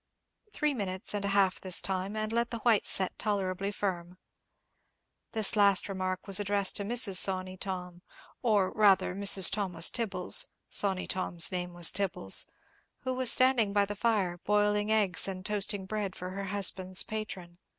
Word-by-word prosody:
Three 300 -6 -1
minutes 190 -6 -4
and 205 -1 -2
a - - -1
half 195 -2 +1
this 185 -2 +3
time, 190 +2 -4
and 215 +1 -3
let 235 0 0
the 235 - -5
white 225 -3 +2
set 190 -1 -2
tolerably 195 -2 -2
firm." 180 -3 -5 1.2
This 220 -1 +3
last 200 -2 +3
remark 185 -1 -4
was 195 -1 +1
addressed 200 -1 +1
to 205 - -3
Mrs. 205 -3 +3
Sawney 185 0 +2
Tom, 180 -2 -7 0.4
or 210 -6 +1
rather 200 -4 +2
Mrs. 195 -1 +5
Thomas 185 -5 -1
Tibbles—Sawney 195 -2 0
Tom's 175 -2 +1
name 180 -1 -5
was 175 -1 +1
Tibbles—who 200 - -2
was 255 -1 +2
standing 250 -6 +3
by 205 -1 +2
the 205 +1 -6
fire, 200 -6 -1
boiling 210 0 0
eggs 200 -5 +1
and 185 -1 -7
toasting 205 -2 -3
bread 200 -1 -4
for 180 0 -7
her 195 +1 -6
husband's 185 -1 +1
patron. 185 -5 -7
195 Hz, 155 wpm, -29 LUFS, 185-210 Hz, 1.2 s, Mrs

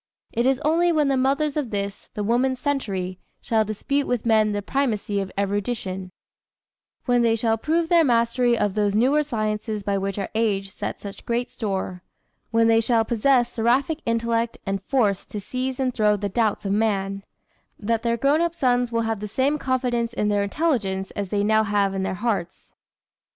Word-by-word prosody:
It 235 +2 +1
is 265 -1 +2
only 340 +3 +3
when 300 -3 +2
the 270 - +2
mothers 275 +3 +1
of 295 -6 -1
this, 200 -1 -4
the 210 - -2
woman's 250 +4 +1
century, 195 -10 -2 0.2
shall 220 -1 +1
dispute 275 +7 -1
with 245 -2 -1
men 215 -2 +3
the 205 0 -2
primacy 215 -6 -1
of 190 - -5
erudition 195 -2 -2 0.9
when 245 -1 +3
they 230 -1 +3
shall 225 0 +1
prove 325 +8 0
their 335 -1 +5
mastery 240 -1 +2
of 205 -3 0
those 205 -1 +1
newer 265 +7 +3
sciences 215 -5 -2
by 200 0 0
which 195 0 -3
our 195 - -3
age 200 -3 0
sets - - -5
such 200 -1 -8
great 240 +1 -2
store 190 -4 -3 0.5
when 230 0 +3
they 225 0 +5
shall 230 -1 +2
possess 240 +1 +2
"Seraphic 260 +7 +1
intellect 230 0 0
and 195 -1 -2
force 205 -5 +1
To 210 - -5
seize 255 +5 -4
and 255 -2 0
throw 210 -2 +3
the 205 0 -3
doubts 215 0 0
of 195 - -1
man"; 195 -2 0 0.5
that 225 +1 -1
their 235 -1 0
grown 280 +6 +2
up 340 0 0
sons 245 -4 +1
will 230 0 +1
have 225 -2 -2
the 210 - -5
same 270 +7 0
confidence 245 -3 -1
in 210 -2 0
their 205 -1 +2
intelligence 200 -6 -1
as 200 -2 -4
they 205 0 0
now 220 +1 +3
have 200 -2 +1
in 195 - -2
their 190 0 -2
hearts. 205 -5 -3
225 Hz, 190 wpm, -23 LUFS, 205-255 Hz, 0.9 s, their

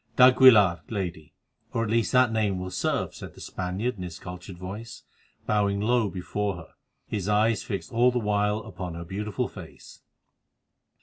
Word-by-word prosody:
"D'Aguilar, 125 -8 +7
Lady, 90 -8 -5 0.4
or 115 - 0
at 110 - -2
least 115 -1 +1
that 125 -2 +4
name 105 -4 0
will 90 0 -5
serve," 90 - -1
said - - -10
the - - -14
Spaniard 95 +6 -3
in - - -8
his 85 -3 -6
cultured 90 +1 -9
voice, 105 +5 -8 0.4
bowing 100 -1 +1
low 115 0 +2
before 100 +2 -3
her, 80 -3 -11 0.4
his 100 -2 -3
eyes 105 +1 +3
fixed 100 - -5
all 120 +2 +4
the 125 - -1
while 105 -1 +1
upon 90 -4 -7
her 85 0 -7
beautiful 100 +3 -3
face. - - -12
105 Hz, 165 wpm, -26 LUFS, 90-110 Hz, 0.4 s, D'Aguilar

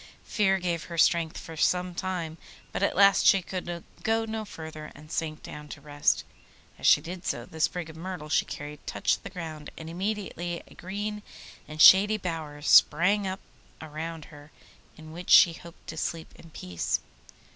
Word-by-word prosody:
Fear 195 -2 +2
gave 175 -2 -2
her 170 - -7
strength 165 0 +3
for 165 - -9
some 180 +3 +1
time, 170 -3 -4 0.3
but - - -3
at - - +1
last 200 0 +6
she 195 -2 +5
could 175 -2 -5 0.2
go 225 0 +1
no 220 -1 -4
further, 160 -5 -9
and 155 +1 -14
sank 155 -1 -3
down 150 0 -9
to 150 - -9
rest. 145 0 0 0.6
As - - 0
she - - +7
did 180 +1 -7
so, 120 -8 -3
the 160 - -12
sprig 170 +1 0
of 160 - -11
myrtle 175 -1 -6
she - - +2
carried 145 0 -8
touched - - 0
the - - -8
ground, 160 -4 -7
and 160 0 -8
immediately 180 -2 -3
a - - -16
green 205 +3 -5 0.5
and 155 0 -9
shady 205 +6 +8
bower 160 -6 -5
sprang 185 +7 +5
up 190 +1 -4 0.4
round 160 0 -6
her, 145 +1 -14 0.5
in 155 0 -11
which 175 +2 -9
she 170 - +8
hoped 170 +1 -14
to 160 - -8
sleep 160 0 -3
in 165 - -15
peace. 90 - -3
170 Hz, 180 wpm, -27 LUFS, 155-185 Hz, 0.6 s, shady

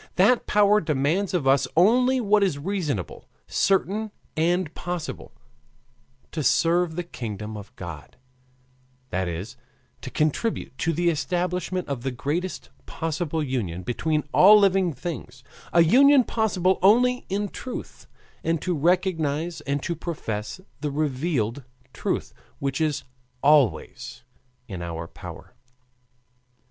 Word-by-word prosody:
That 210 +7 +4
Power 210 0 +4
demands 155 +5 0
of 165 -6 0
us 135 -1 +4
only 250 +8 +4
what 210 -2 +3
is 190 -8 +1
reasonable, 150 - -3 0.2
certain, 200 +3 +1 0.3
and 170 0 +1
possible: 175 -2 -5 1.0
to 160 - -3
serve 170 +3 +2
the 175 - -2
kingdom 110 - -6
of 105 -1 -9
God, 80 -6 -9 0.9
that 95 0 -1
is, 85 +5 -5 0.4
to - - -6
contribute 155 - -1
to 165 - +1
the 170 +2 +2
establishment 180 +3 -2
of 140 -4 -3
the 135 - -2
greatest 150 +9 -3 0.2
possible 160 -1 -2
union 105 - -3
between 150 - -1
all 210 +3 +8
living 195 -3 +3
beings 130 -3 -7 0.3
a 170 - +6
union 270 - +6
possible 190 -6 +1
only 245 +6 +4
in 200 +2 -1
the 200 - -7
truth; 255 - -8 0.4
and 165 0 +1
to 180 - 0
recognize 165 -1 0
and 140 0 -1
to 170 - -2
profess 115 - -5 0.2
the 150 0 -2
revealed 140 -4 -1 0.3
truth, - - -3 0.2
which 135 +1 -2
is 150 -3 0 0.4
always 145 -4 +2 0.4
in 95 -5 -6
our 85 -1 -5
power. - - -11
165 Hz, 125 wpm, -25 LUFS, 135-185 Hz, 1.0 s, all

